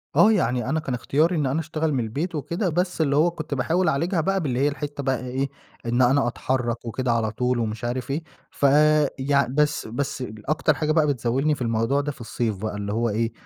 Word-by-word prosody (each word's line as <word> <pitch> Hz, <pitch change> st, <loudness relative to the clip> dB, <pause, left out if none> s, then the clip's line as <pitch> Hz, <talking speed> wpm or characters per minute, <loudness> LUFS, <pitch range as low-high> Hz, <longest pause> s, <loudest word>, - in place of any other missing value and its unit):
آه. 220 Hz, -, +6 dB
يعني 125 Hz, -, +1 dB
أنا 160 Hz, +3 st, +1 dB
كان 135 Hz, -4 st, -4 dB
اختياري 155 Hz, +8 st, +1 dB
إن 150 Hz, -3 st, 0 dB
أنا 135 Hz, +5 st, 0 dB
أشتغل 160 Hz, -1 st, -1 dB
من 130 Hz, -, +1 dB
البيت 150 Hz, +10 st, -3 dB
وكده، 170 Hz, +6 st, -1 dB
بس 180 Hz, +1 st, -1 dB
اللي 140 Hz, -3 st, +2 dB
هو 165 Hz, +4 st, +4 dB
كنت 155 Hz, -3 st, -6 dB
باحاول 165 Hz, +7 st, +1 dB
أعالجها 165 Hz, +4 st, 0 dB
بقى 195 Hz, +2 st, 0 dB
باللي 130 Hz, -4 st, -1 dB
هي 145 Hz, -, +3 dB
الحتّة 145 Hz, -1 st, -4 dB
بقى 130 Hz, -2 st, 0 dB
إيه، 135 Hz, +2 st, -1 dB, 0.4 s
إن 120 Hz, +2 st, +1 dB
أنا 130 Hz, +1 st, +4 dB
أتحرّك 120 Hz, -1 st, -2 dB
وكده 125 Hz, +2 st, -1 dB
على 115 Hz, -2 st, +1 dB
طول 125 Hz, +1 st, 0 dB
ومش 110 Hz, +1 st, -3 dB
عارف 125 Hz, +2 st, -3 dB
إيه، 155 Hz, +4 st, -2 dB, 0.3 s
ف 140 Hz, -, -1 dB, 0.5 s
يع 140 Hz, +1 st, +2 dB
بس 150 Hz, 0 st, 0 dB
بس 130 Hz, +2 st, -3 dB, 0.3 s
أكتر 155 Hz, 0 st, +2 dB
حاجة 150 Hz, +2 st, -1 dB
بقى 155 Hz, -1 st, +3 dB
بتزاولني 135 Hz, +3 st, +1 dB
في 140 Hz, -, -12 dB
الموضوع 115 Hz, +4 st, +1 dB
ده 145 Hz, -, -3 dB
في 135 Hz, -, -13 dB
الصيف 115 Hz, -2 st, -2 dB
بقى 110 Hz, +1 st, -4 dB
اللي 105 Hz, 0 st, -3 dB
هو 115 Hz, +1 st, +1 dB
إيه، 115 Hz, +2 st, 0 dB
135 Hz, 220 wpm, -24 LUFS, 120-155 Hz, 0.5 s, آه